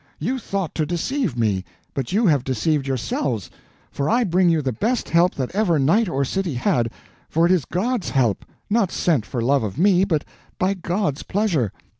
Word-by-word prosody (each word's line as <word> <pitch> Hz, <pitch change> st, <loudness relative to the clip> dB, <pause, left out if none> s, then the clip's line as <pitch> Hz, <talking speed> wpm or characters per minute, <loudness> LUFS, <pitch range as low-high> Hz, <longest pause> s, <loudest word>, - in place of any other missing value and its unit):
You 260 Hz, +1 st, -2 dB
thought 195 Hz, -6 st, -3 dB
to 155 Hz, -, 0 dB
deceive 175 Hz, -, -1 dB
me, 105 Hz, -5 st, +1 dB, 0.3 s
but 135 Hz, -3 st, -3 dB
you 215 Hz, +5 st, +2 dB
have 145 Hz, -8 st, +3 dB
deceived 135 Hz, +3 st, 0 dB
yourselves, 120 Hz, -5 st, -2 dB, 0.4 s
for 140 Hz, -, -2 dB
I 240 Hz, +2 st, +3 dB
bring 180 Hz, -2 st, +3 dB
you 160 Hz, -3 st, +2 dB
the 130 Hz, -, 0 dB
best 225 Hz, -, -1 dB
help 170 Hz, +2 st, +3 dB
that 130 Hz, +2 st, -3 dB
ever 195 Hz, -5 st, +2 dB
knight 175 Hz, +10 st, +3 dB
or 140 Hz, -4 st, 0 dB
city 180 Hz, -1 st, -2 dB
had; 120 Hz, -1 st, +1 dB, 0.4 s
for 165 Hz, +2 st, +3 dB
it 175 Hz, -, +3 dB
is 175 Hz, -8 st, +2 dB
God's 220 Hz, +2 st, -1 dB
help, 120 Hz, -7 st, +1 dB, 0.2 s
not 210 Hz, -3 st, +1 dB
sent 150 Hz, -11 st, +1 dB
for 120 Hz, -3 st, -3 dB
love 140 Hz, +3 st, +3 dB
of 105 Hz, +1 st, -4 dB
me, 185 Hz, +1 st, +4 dB
but 160 Hz, -6 st, 0 dB, 0.3 s
by 185 Hz, +2 st, +1 dB
God's 180 Hz, -4 st, -2 dB
pleasure. 175 Hz, -, 0 dB
165 Hz, 190 wpm, -22 LUFS, 130-195 Hz, 0.4 s, me